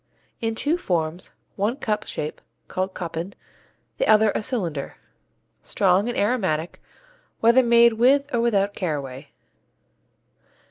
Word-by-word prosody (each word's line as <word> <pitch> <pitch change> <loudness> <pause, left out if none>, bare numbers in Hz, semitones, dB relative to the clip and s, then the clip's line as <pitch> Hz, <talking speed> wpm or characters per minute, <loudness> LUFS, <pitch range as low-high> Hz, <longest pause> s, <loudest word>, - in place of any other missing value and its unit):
In 225 -1 -2
two 310 +9 0
forms, 170 - -2 0.3
one 210 +5 0
cup 215 -6 -2
shape 150 - -5 0.3
(called 185 0 -3
Koppen), 170 +2 -5 0.7
the - - +1
other 215 0 +5
a - - -1
cylinder. 180 - -3 0.6
Strong 195 +3 +1
and 240 - -3
aromatic, 185 -8 -1 0.6
whether 235 +3 +5
made 235 -1 +5
with 260 +5 +4
or 235 - +2
without 205 -4 +1
caraway. 140 -8 -4
205 Hz, 120 wpm, -23 LUFS, 175-235 Hz, 0.7 s, other